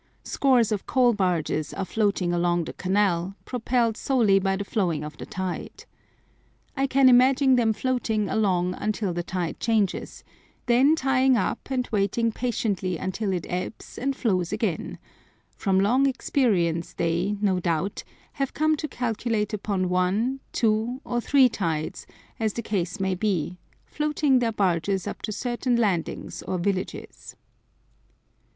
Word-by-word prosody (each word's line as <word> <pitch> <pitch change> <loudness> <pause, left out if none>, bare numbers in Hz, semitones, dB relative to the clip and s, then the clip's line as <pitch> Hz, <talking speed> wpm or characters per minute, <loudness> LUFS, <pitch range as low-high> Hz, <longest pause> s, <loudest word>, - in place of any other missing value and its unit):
Scores 250 -5 +2
of 205 -3 -2
coal 250 -2 +4
barges 175 -6 -1
are 195 - -2
floating 200 -4 0
along 175 0 +1
the - - -7
canal, 190 -1 0
propelled 235 -2 0
solely 225 -7 +3
by 195 0 0
the 200 - -3
flowing 175 -8 -1
of 150 0 -7
the - - -8
tide. 185 -1 -5 0.9
I 275 0 +1
can 270 0 +4
imagine 260 +2 +5
them 235 -3 +3
floating 220 -3 -1
along 180 -4 +1
until 210 -2 -2
the 175 - -2
tide 175 -1 -4
changes, 220 -5 -1 0.4
then 255 +6 +4
tying 265 -3 +3
up 220 - -2
and 255 -2 -1
waiting 215 +3 +1
patiently 210 -7 -2
until 190 +4 -2
it 180 -3 -2
ebbs 180 +4 -5
and 275 +1 -1
flows 185 -9 0
again; 210 -6 -2 0.6
from 190 -2 +1
long 250 +8 +3
experience 195 - 0
they, 175 +5 0
no 195 -3 +1
doubt, 175 +2 -1 0.3
have 275 -2 -3
come 310 0 +2
to 305 - -3
calculate 230 -4 -2
upon 195 -3 -1
one, 190 +9 +1
two, 225 +3 0
or 240 -1 -1
three 270 +1 +5
tides, 165 -9 -3 0.3
as 220 -2 0
the 235 - -4
case 190 -1 -2
may 190 -1 0
be, 180 -3 -1 0.3
floating 300 -3 +1
their 235 -2 +1
barges 190 -2 0
up - - -6
to - - -3
certain 245 +2 -1
landings 200 -8 -1
or 185 - -3
villages. 185 +1 -4
210 Hz, 145 wpm, -25 LUFS, 185-245 Hz, 0.9 s, imagine